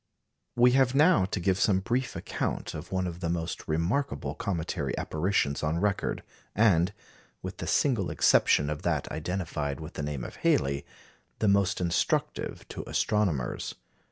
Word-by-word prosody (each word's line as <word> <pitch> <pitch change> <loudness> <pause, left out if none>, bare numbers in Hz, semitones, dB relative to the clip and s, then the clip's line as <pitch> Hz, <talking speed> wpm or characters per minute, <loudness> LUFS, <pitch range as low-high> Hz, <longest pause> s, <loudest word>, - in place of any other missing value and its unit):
We 125 +1 +6
have 130 0 +3
now 150 - +5
to 95 - -3
give 95 +1 +1
some 95 -2 +3
brief 125 +6 -1
account - - -3
of 80 +3 -8
one 95 -1 0
of 85 -1 -5
the 85 - -2
most 85 -1 -3
remarkable 85 - -1
cometary 95 -8 -2
apparitions 80 -3 0
on 80 +2 0
record, 100 +1 -1 0.3
and 95 -4 +4 0.5
with - - -6
the - - -5
single 120 -10 +2
exception 70 +1 +4
of 75 - -4
that - - -1
identified 80 -3 -3
with 80 +2 -8
the - - -4
name 70 -3 -3
of - - -8
Halley 70 +1 +1 0.5
the 110 - +1
most 100 0 +3
instructive 85 -2 -1
to - - -6
astronomers. 95 - 0
90 Hz, 155 wpm, -28 LUFS, 80-105 Hz, 0.5 s, We